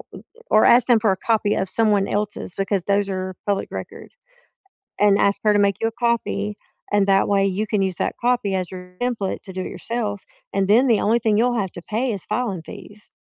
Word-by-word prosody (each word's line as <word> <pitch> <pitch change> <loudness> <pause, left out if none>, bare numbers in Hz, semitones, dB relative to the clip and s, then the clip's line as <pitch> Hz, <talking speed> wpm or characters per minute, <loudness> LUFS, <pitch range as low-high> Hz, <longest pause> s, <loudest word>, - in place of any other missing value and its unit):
eh, - - -9 0.3
or 215 - +5
ask 240 +1 +6
them 240 -3 +5
for 215 -2 +2
a 190 - -1
copy 215 0 +1
of 190 - -2
someone 205 -1 +3
else's 205 -3 -3
because 195 -1 -1
those 200 0 +1
are 185 -1 -4
public 200 -1 -1
record - - -8 0.9
and 205 -1 +4
ask 200 0 +2
her 210 -1 +4
to 205 - +3
make 200 -1 +3
you 225 - +2
a - - -14
copy. 225 -3 -1 0.4
And 205 -1 +3
that 195 0 +3
way, 200 -1 +2
you 195 +3 -1
can 210 -1 0
use 190 -2 -1
that - - -2
copy 240 -5 0
as 185 -2 -3
your 180 -1 -10
template 235 -6 -2
to 190 - -9
do 185 - -5
it - - -5
yourself, 215 -4 -4 0.3
and 195 -1 +1
then 245 +6 +5
the 225 -3 +3
only 225 +3 +2
thing 220 -2 +1
you'll 240 +1 +2
have 190 -3 -2
to 175 - -8
pay 230 +7 -2
is 195 - -6
filing 210 -9 -2
fees. 210 +5 -12
205 Hz, 225 wpm, -21 LUFS, 195-225 Hz, 0.9 s, ask